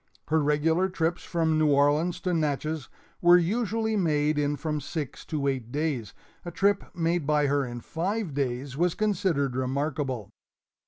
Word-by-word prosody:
Her 160 0 +3
regular 160 +5 +2
trips 170 -1 -1
from 160 -2 +1
New 155 -1 +3
Orleans 145 +5 +3
to 180 -1 -1
Natchez 155 -2 -1 0.3
were 175 0 +7
usually 220 +4 0
made 150 -5 +1
in 145 0 +1
from 150 0 -3
six 145 -1 -5
to 145 -3 -2
eight 130 -4 -2
days; 140 -8 -2 0.3
a 175 - -5
trip 200 +4 +1
made 165 -2 0
by 150 -1 +3
her 140 0 +2
in 120 0 -6
five 185 - -2
days 135 -1 -2
was 175 +3 +1
considered 180 -11 0
remarkable. 130 -3 -2
155 Hz, 155 wpm, -27 LUFS, 140-175 Hz, 0.3 s, were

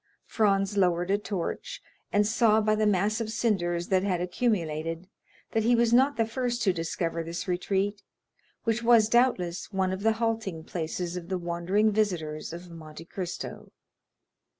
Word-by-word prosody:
Franz 200 -2 +1
lowered 180 -1 +2
a 200 - +4
torch, 195 -4 -4 0.3
and 205 0 +3
saw 220 0 +4
by 215 0 +2
the 215 0 +2
mass 210 +3 +1
of 220 - -3
cinders 175 -7 0
that 190 -1 +3
had 185 -3 0
accumulated 170 -4 -1 0.4
that 225 - +1
he 235 +2 +3
was 235 0 +3
not 270 +4 +4
the 225 - +2
first 240 +1 -2
to 190 - +3
discover 165 0 -2
this 170 +3 -5
retreat, 195 +3 -1 0.6
which 230 -1 0
was, 230 -2 +5
doubtless, 215 -9 +1
one 190 -1 0
of 190 - -4
the 225 +1 +3
halting 225 -7 -2
places 170 +1 -4
of 175 0 -8
the 190 - 0
wandering 175 +5 +1
visitors 175 -8 -1
of 175 +1 -9
Monte 160 -1 -10
Cristo. 180 0 -6
195 Hz, 160 wpm, -28 LUFS, 175-220 Hz, 0.6 s, was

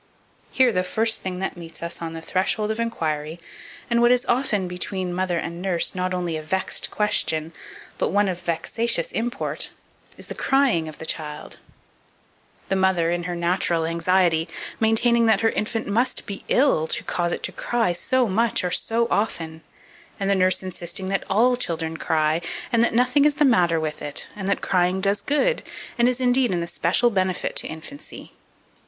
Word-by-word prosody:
Here 260 -2 +3
the 180 -3 +1
first 220 +4 +1
thing 185 -1 -4
that 190 - -3
meets 170 -1 -10
us 170 - -4
on 165 -1 -4
the 165 0 -7
threshold 210 +5 0
of 220 - -4
inquiry, 160 -8 -2 0.5
and 235 -1 +2
what 240 0 +5
is 250 0 +3
often 230 -7 0
between 180 0 -3
mother 180 -1 0
and 170 +1 -4
nurse 180 -3 0
not 185 -1 -2
only 175 -3 -2
a 155 - -3
vexed 190 +5 -1
question, 165 -6 0 0.5
but - - +1
one 205 +1 +2
of 180 -2 -3
vexatious 175 +4 0
import, 235 +2 -2 0.5
is - - -6
the - - -5
crying 265 - +2
of 155 - -11
the 160 - -6
child; 150 -2 -4 1.1
the 195 - 0
mother, 190 -3 +2
in 175 -1 -2
her 175 -1 -3
natural 170 -1 +1
anxiety, 170 0 +2 0.3
maintaining 230 +1 +3
that 215 -3 +3
her 225 - +3
infant 225 +1 -2
must 240 +5 0
be 200 - -7
ill 250 - +3
to - - -2
cause 175 -1 -1
it - - -3
to - - -1
cry 230 -7 0
so 255 +7 +1
much 220 +2 +1
or 180 - -1
so 230 +4 +1
often, 165 -6 -1 0.6
and 195 0 0
the - - +5
nurse 185 -1 +3
insisting 185 +1 -3
that 195 0 0
all 240 +6 +4
children 165 -8 -2
cry, 155 0 +1 0.3
and 235 0 +4
that 235 - +1
nothing 255 +4 +4
is 295 -1 +3
the 295 0 +3
matter 175 -10 +3
with 155 -1 -4
it, 145 -1 -2
and 195 -1 -4
that - - 0
crying 180 0 +2
does 200 +1 +1
good, 475 +13 +1 0.4
and 240 +1 +5
is, 250 0 -1
indeed, 250 0 +3
an 175 -2 0
especial 175 +7 +1
benefit 185 -2 -1
to - - -1
infancy. 165 - -9
185 Hz, 185 wpm, -23 LUFS, 170-230 Hz, 1.1 s, what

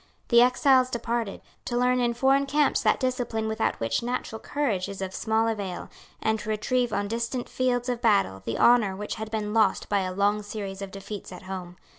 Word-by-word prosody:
The 235 -1 +7
exiles 255 +1 +4
departed, 235 -3 -3 0.2
to 240 - -2
learn 250 +1 +3
in 240 -1 +1
foreign 270 +3 +3
camps 290 0 +2
that - - +2
discipline 245 -4 -1
without 220 0 -1
which 115 0 0
natural 240 -2 -3
courage 220 -12 -1
is 200 - -7
of 190 -1 -4
small 220 +2 +1
avail, 200 -5 -4 0.3
and 220 0 0
to 210 - -6
retrieve 240 +3 0
on 200 0 -1
distant 235 +3 -3
fields 245 -1 0
of 245 -1 -2
battle 195 - +2
the 115 - -3
honour 230 -5 +4
which 210 +2 -4
had 220 - -4
been 215 -1 -3
lost 215 -4 +2
by 205 - +2
a 185 -1 -2
long 200 +2 +1
series 200 -2 -6
of 195 - -5
defeats 200 +1 -8
at - - -10
home. 185 -2 -7
220 Hz, 200 wpm, -26 LUFS, 200-245 Hz, 0.3 s, The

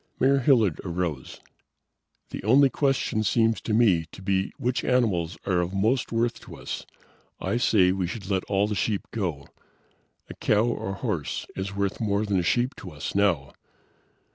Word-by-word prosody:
Mayor 135 +1 +4
Hilliard 120 - +3
arose. 85 -7 -4 0.9
"The - - -6
only 130 +6 +5
question 135 -6 0
seems 115 +2 +2
to - - -4
me 100 -8 +3
to 95 - -12
be 95 0 0
which 125 +1 -1
animals 100 -10 +1
are 90 -2 +2
of 90 +2 -3
most 110 +6 +1
worth 115 +1 0
to - - -11
us. - - -6 0.5
I 115 - -1
say 100 -6 +4
we 95 -1 -1
should 100 +1 -6
let 95 -2 0
all 100 0 +1
the 105 - -2
sheep 105 0 -1
go. 85 -10 -3 0.8
A - - -8
cow 105 0 +2
or 120 -4 -2
a - - -2
horse 100 - -3
is 100 +1 -4
worth 100 +1 -2
more 105 -1 +1
than 100 -3 +1
a - - +2
sheep 120 +9 +1
to 95 - -8
us 75 -2 -6
now. 85 -10 +1
100 Hz, 175 wpm, -26 LUFS, 90-115 Hz, 0.9 s, only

